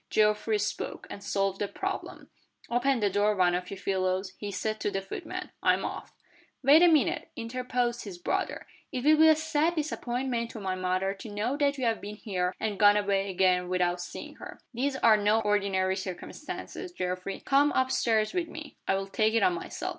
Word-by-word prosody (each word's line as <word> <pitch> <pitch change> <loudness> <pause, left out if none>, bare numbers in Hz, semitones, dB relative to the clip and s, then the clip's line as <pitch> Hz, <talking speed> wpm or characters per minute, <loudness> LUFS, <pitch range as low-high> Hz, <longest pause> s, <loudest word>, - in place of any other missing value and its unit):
Geoffrey 210 0 +2
spoke, 210 0 -3
and 200 - -8
solved 195 -1 0
the 205 - 0
problem 390 - -5 0.4
"Open 245 +1 +2
the 205 - +3
door, 205 +2 +2
one 180 -2 +3
of 180 0 -2
you 195 - -6
fellows," 185 0 -1
he 205 - -4
said 215 +3 -2
to - - 0
the 195 - -2
footmen. 195 0 -6
"I'm - - +2
off." - - -6 0.5
"Wait 290 +5 +7
a 350 - +8
minute," 315 -5 +2
interposed 240 0 -2
his 190 -4 -7
brother. 175 - -2 0.3
"It 255 -4 -3
will 305 +2 +6
be 320 +1 +7
a 315 - +7
sad 315 +2 +1
disappointment 250 -5 -2
to 225 - -8
my 190 -2 -2
mother 185 +1 0
to 200 +3 -10
know 210 +6 -1
that 285 -1 +1
you 260 - -1
have 225 -1 0
been 205 +1 -6
here, 185 -4 -2
and 210 -3 -2
gone 205 0 +7
away 200 -1 +1
again 180 -1 +2
without 180 -1 +1
seeing - - -8
her. - - -10
These 265 +3 -1
are 225 -4 +5
no 210 +2 +3
ordinary 195 -3 +1
circumstances, 195 - -6
Geoffrey. 185 - -4
Come 285 +2 +4
up 260 0 +2
stairs 220 -1 +1
with 355 -2 -1
me 310 -2 -9
I'll 195 0 +1
take 215 +3 +1
it 230 - +3
on 365 - +4
myself." 365 +1 -5
210 Hz, 195 wpm, -28 LUFS, 195-260 Hz, 0.5 s, a